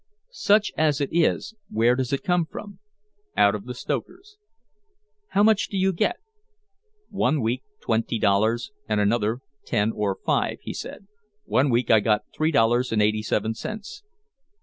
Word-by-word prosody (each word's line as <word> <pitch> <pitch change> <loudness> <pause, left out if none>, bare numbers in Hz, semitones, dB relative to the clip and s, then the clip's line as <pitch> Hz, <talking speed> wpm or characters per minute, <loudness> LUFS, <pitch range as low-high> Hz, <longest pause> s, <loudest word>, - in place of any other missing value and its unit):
"Such 210 - +2
as 155 -2 +2
it 140 - -1
is, 170 +5 +1 0.2
where 115 +3 +3
does 130 -1 -2
it 140 - -1
come 175 -2 +1
from?" 200 +3 -9 0.6
"Out 100 - +5
of 105 -1 -5
the 125 0 -6
stokers." 365 - -5 0.9
"How 200 - +2
much 215 -1 +4
do 200 - -3
you 190 0 +2
get?" 340 - +1 1.0
"One 155 -6 +1
week 120 +2 -1 0.2
twenty 115 0 0
dollars 110 - +1 0.2
and 105 -1 +1
another 110 +3 +1 0.2
ten 110 -1 0
or 100 -2 -1
five," - - +1
he - - -5
said. - - -8 0.4
"One 135 +2 +2
week 120 -1 +1
I 110 - +7
got 105 0 +1
three 155 +1 +1
dollars 120 -2 +2
and 110 - +1
eighty 105 +1 +2
seven 110 +1 -1
cents." 210 - -7
125 Hz, 160 wpm, -24 LUFS, 110-175 Hz, 1.0 s, I